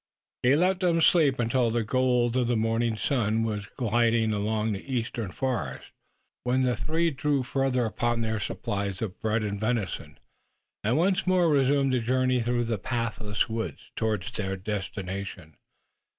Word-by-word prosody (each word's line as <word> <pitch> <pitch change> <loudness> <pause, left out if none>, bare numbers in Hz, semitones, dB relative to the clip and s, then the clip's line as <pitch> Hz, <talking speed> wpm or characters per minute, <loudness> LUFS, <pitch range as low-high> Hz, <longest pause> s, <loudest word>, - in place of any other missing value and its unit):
He 125 +3 +4
let 180 +4 +2
them 175 -3 +2
sleep 155 -5 +4
until 120 0 +2
the 115 0 0
gold 125 0 +2
of 125 -2 +2
the 120 - +1
morning 115 +1 +1
sun 115 -3 +1
was 105 -3 -3
gilding 115 -2 +2
the 105 0 -1
eastern 115 -4 -2
forest, 110 - -3 0.5
when 125 +1 +2
the 125 -1 +2
three 165 +7 0
drew 140 0 0
further 130 -1 0
upon 120 +1 -1
their 110 -1 -1
supplies 100 0 -3
of 105 -2 -5
bread 110 0 0
and 100 -1 -3
venison 100 -10 -2 0.7
and 115 +6 +2
once 185 +3 +2
more 185 -2 +4
resumed 140 -1 +3
the 125 - +3
journey 130 +1 +1
through 120 +1 0
the 115 -3 -2
pathless 115 -2 -2
woods 110 -9 -5
towards 105 -5 -1
their 95 -2 -3
destination. 95 -4 -5
115 Hz, 150 wpm, -27 LUFS, 105-130 Hz, 0.7 s, He